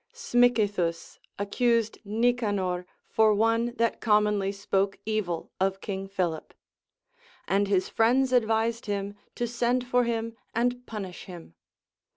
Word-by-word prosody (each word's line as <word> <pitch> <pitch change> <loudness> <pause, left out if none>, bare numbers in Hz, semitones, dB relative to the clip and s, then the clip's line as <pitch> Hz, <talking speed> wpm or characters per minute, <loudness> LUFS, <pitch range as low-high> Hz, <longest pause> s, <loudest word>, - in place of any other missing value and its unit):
Smicythus 220 - +1 0.2
accused 225 +2 +1
Nicanor 205 -5 0 0.2
for 220 -1 +4
one 230 +2 +1
that 230 -1 0
commonly 210 -2 +2
spoke 195 0 -1
evil 210 -6 -2
of 190 0 +1
King 195 -1 -5
Philip; 180 -5 -3 0.9
and 200 +1 +2
his 190 -2 +1
friends 255 +3 +2
advised 225 -1 +1
him 200 0 -2 0.2
to 240 - -1
send 240 +1 0
for 245 0 +2
him 230 -1 -2 0.2
and 245 +1 0
punish 195 -5 -6
him. 175 - -11
215 Hz, 120 wpm, -27 LUFS, 195-235 Hz, 0.9 s, for